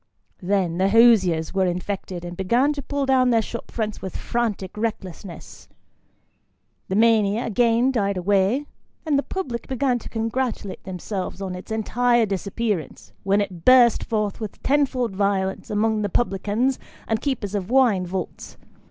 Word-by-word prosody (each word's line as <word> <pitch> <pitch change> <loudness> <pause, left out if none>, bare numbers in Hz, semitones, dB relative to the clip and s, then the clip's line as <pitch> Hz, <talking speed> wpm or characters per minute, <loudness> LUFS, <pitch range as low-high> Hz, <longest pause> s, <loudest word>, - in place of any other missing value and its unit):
Then, 180 -2 0
the 190 +1 +3
hosiers 195 -8 +4
were 190 -1 +2
infected, 180 0 -4
and 175 0 -6
began 240 +11 +2
to 285 - -5
pull 285 0 -2
down 260 -1 +3
their 230 -2 +4
shop 235 - -7
fronts 215 -2 -4
with 190 - -5
frantic 220 -6 -2
recklessness. 195 -5 -6 1.2
The 190 - -2
mania 220 0 +3
again 235 +3 +2
died 200 -6 0
away, 200 +8 +1 0.4
and 295 -3 +2
the - - +1
public 260 -10 -5
began 260 -1 0
to - - -10
congratulate 225 -2 -3
themselves 185 0 -5
on 190 -2 -4
its 180 +4 -9
entire 240 +2 +2
disappearance, 200 -1 -3
when 200 +1 +2
it 185 -4 -5
burst 250 -3 +6
forth 210 -3 -2
with 215 -3 -7
ten 285 +1 +3
fold 245 -6 -3
violence 195 -1 -1
among 215 +1 +1
the 205 - -1
publicans, 220 +5 0 0.3
and 220 0 0
keepers 250 -8 -2
of 200 -1 -3
"wine 235 -8 +3
vaults." 185 0 -6
215 Hz, 150 wpm, -23 LUFS, 190-240 Hz, 1.2 s, burst